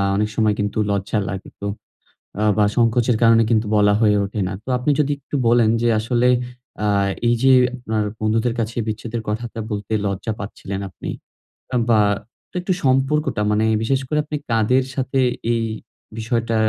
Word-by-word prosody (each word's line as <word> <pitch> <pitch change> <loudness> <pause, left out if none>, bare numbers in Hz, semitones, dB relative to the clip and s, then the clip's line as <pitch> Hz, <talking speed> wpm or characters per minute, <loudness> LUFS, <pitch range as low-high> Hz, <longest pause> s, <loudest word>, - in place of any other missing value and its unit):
অনেক 105 +1 0
সময় 110 -2 +2
কিন্তু 105 +1 -2
লজ্জা 100 +2 -1
লাগে। 95 0 -6
তো 100 - -4 0.8
আ - - +1
বা 105 - +4
সংকোচের 120 0 +3
কারণে 115 0 +6
কিন্তু 110 -1 +2
বলা 105 0 +4
হয়ে 105 -2 +4
ওঠে 105 +1 -4
না। - - -4
তো - - -14
আপনি 130 +4 0
যদি 145 0 +1
একটু 145 - -5
বলেন 120 -2 +4
যে 120 - +3
আসলে 120 +2 +1 0.6
আ - - +2 0.4
এই 120 - +4
যে 135 0 +6 0.2
আপনার 110 -4 -2 0.2
বন্ধুদের 110 +2 +1
কাছে 115 0 -2
বিচ্ছেদের 110 +1 -4
কথাটা 115 +2 -4
বলতে 105 0 -4
লজ্জা 100 +3 -2
পাচ্ছিলেন 100 -1 -6
আপনি। 90 - -7 0.8
বা 110 -2 +5 0.6
একটু 185 +1 0
সম্পর্কটা 135 -1 +1
মানে 110 +1 +2 0.2
বিশেষ 135 +4 +1
করে 150 +3 0
আপনি 150 0 -4
কাদের 115 +3 +3
সাথে 135 0 -1 0.3
এই 115 -1 0 0.5
বিষয়টা 115 0 -1
115 Hz, 160 wpm, -21 LUFS, 105-125 Hz, 0.8 s, কারণে